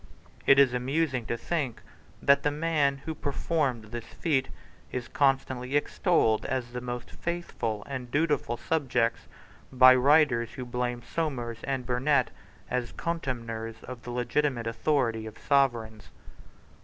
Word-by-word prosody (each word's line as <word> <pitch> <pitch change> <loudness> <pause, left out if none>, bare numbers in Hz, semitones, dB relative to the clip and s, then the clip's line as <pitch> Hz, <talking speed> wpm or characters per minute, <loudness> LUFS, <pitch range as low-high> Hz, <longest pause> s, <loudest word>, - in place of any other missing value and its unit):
It 135 - +7
is 135 -3 +6
amusing 130 0 0
to 120 - -1
think 140 -5 -2 0.4
that 140 0 +5
the 145 - +2
man 145 -3 0
who 160 - -2
performed 140 -6 -1
this 120 -1 -4
feat 135 -3 -1 0.4
is 125 -1 -4
constantly 135 -1 0
extolled 145 - +2
as 125 -2 -3
the 125 - -4
most 125 0 -5
faithful 120 -11 -3
and 130 -3 -6
dutiful 145 -3 +1
of - - -15
subjects 125 -7 0 0.4
by 130 0 +8
writers 130 -3 +4
who 130 - -6
blame 120 0 -3
Somers 120 -9 -3
and 135 -2 -2
Burnet 130 +2 +2 0.4
as 125 -2 -2
contemners 115 -9 -4
of 125 -2 -8
the 125 - -9
legitimate 125 +1 0
authority 115 -2 0
of 110 - -10
Sovereigns. 120 -6 +1
130 Hz, 135 wpm, -28 LUFS, 120-145 Hz, 0.4 s, by